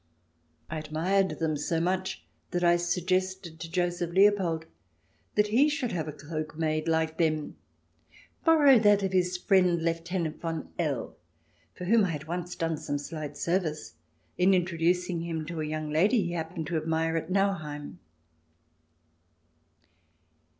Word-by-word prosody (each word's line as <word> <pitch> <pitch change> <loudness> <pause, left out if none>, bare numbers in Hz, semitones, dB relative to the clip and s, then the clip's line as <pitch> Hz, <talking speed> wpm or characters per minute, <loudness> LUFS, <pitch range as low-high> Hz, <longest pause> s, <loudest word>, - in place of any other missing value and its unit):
I 155 - -4
admired 175 +6 0
them 160 -1 0
so 155 +3 -1
much 185 +2 -1 0.3
that 175 -1 -1
I 175 0 +5
suggested 180 0 -1
to 165 0 -6
Joseph 175 -1 0
Leopold 185 -3 +3 0.7
that 210 0 +3
he 265 +8 +4
should 290 -5 -2
have 160 -3 -2
a - - -3
cloak 155 +1 -6
made 155 0 -1
like 160 0 0
them 155 -2 0 0.4
— - - -28
borrow 290 -6 +6
that 205 -2 +4
of 190 - 0
his 180 -1 +2
friend 180 -2 +3
Lieutenant 165 0 -2
von 165 -2 -4
L., 150 -7 -2 0.6
for 180 - -6
whom 220 +3 +4
I - - -2
had 155 -2 -4
once 175 +1 -4
done 165 -2 -1
some 145 -2 -3
slight 150 0 -6
service 170 - -1 0.5
in 185 +2 +5
introducing 175 0 0
him 165 -2 -3
to 165 0 -4
a - - -2
young 155 0 -3
lady 200 +8 +3
he 175 - -3
hap 165 0 -4
pened 160 -2 -3
to 170 - 0
admire 160 +1 0
at 165 +1 -2
Nauheim. 170 -7 -1
170 Hz, 150 wpm, -28 LUFS, 160-185 Hz, 0.7 s, borrow